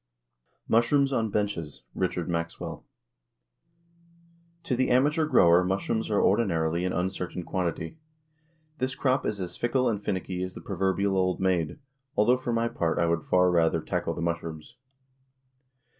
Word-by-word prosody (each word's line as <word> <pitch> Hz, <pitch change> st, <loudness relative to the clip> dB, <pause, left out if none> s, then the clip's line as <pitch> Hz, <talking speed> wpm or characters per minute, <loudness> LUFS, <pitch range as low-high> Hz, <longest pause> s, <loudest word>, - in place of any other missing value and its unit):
MUSHROOMS 135 Hz, +5 st, +3 dB
ON 115 Hz, -3 st, +1 dB
BENCHES. 100 Hz, -, -3 dB
RICHARD -, -, -2 dB
MAXWELL. 85 Hz, -1 st, -4 dB, 1.8 s
To 130 Hz, -, -1 dB
the 130 Hz, +1 st, +1 dB
amateur 150 Hz, +5 st, +3 dB
grower 85 Hz, -, +5 dB
mushrooms 100 Hz, +5 st, -1 dB
are 105 Hz, -, +2 dB
ordinarily 85 Hz, -5 st, +2 dB
an 90 Hz, -, 0 dB
uncertain 90 Hz, 0 st, -3 dB
quantity. 85 Hz, -, -3 dB, 0.8 s
This 130 Hz, 0 st, -1 dB
crop 130 Hz, 0 st, +1 dB
is 105 Hz, -, -2 dB
as 90 Hz, -2 st, -5 dB
fickle 125 Hz, +2 st, +1 dB
and 105 Hz, -3 st, -1 dB
finicky 95 Hz, -2 st, -3 dB
as 90 Hz, 0 st, -4 dB
the -, -, -8 dB
proverbial 95 Hz, +1 st, 0 dB
old 95 Hz, -1 st, +1 dB
maid 90 Hz, -, 0 dB, 0.4 s
although, 120 Hz, +5 st, +4 dB
for 125 Hz, -1 st, -3 dB
my 115 Hz, 0 st, +1 dB
part, 85 Hz, -7 st, -1 dB
I 85 Hz, -, +2 dB
would 85 Hz, -1 st, +1 dB
far 90 Hz, 0 st, +4 dB
rather 85 Hz, -2 st, +3 dB
tackle -, -, -2 dB
the -, -, -4 dB
mushrooms. 85 Hz, +4 st, -4 dB
95 Hz, 145 wpm, -27 LUFS, 85-115 Hz, 1.8 s, grower